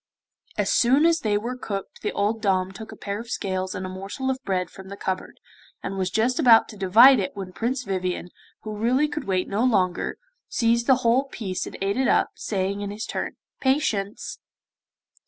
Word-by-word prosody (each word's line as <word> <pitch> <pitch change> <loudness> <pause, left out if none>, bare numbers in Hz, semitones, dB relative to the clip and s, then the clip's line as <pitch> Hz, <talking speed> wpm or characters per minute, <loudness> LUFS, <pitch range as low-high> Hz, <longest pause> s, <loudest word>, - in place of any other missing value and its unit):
As - - +1
soon 265 +6 +4
as 335 0 +4
they 210 -5 +1
were 235 +4 -3
cooked 200 -6 -6
the - - -1
old 210 +2 0
dame 190 -3 +1
took 220 +3 -9
a - - -9
pair 200 0 -4
of 230 +1 -9
scales 185 -3 -2
and 185 - -4
a - - -4
morsel 195 +8 -3
of 260 0 -4
bread 180 -3 -1
from 190 0 -11
the 200 - -7
cupboard, 190 -1 -4 0.4
and 195 - -3
was 190 -1 -1
just 235 - +1
about 240 -7 +7
to - - -9
divide 220 +7 +7
it 190 - -3
when 190 -2 -6
Prince 250 +5 -2
Vivien, 185 -3 -2 0.3
who 215 -1 -5
really 250 +7 +2
could 295 -2 -5
wait 185 -1 0
no 205 +4 0
longer, 190 -8 +1 0.3
seized 235 0 +1
the 265 - +7
whole 245 +4 +4
piece 200 -8 -4
and - - -8
ate 200 +3 0
it 265 -1 +2
up, - - +3
saying 200 0 -2
in 205 - -3
his 210 +2 -5
turn, - - -3 0.3
'Patience. 230 -8 -1
210 Hz, 200 wpm, -24 LUFS, 190-245 Hz, 0.4 s, about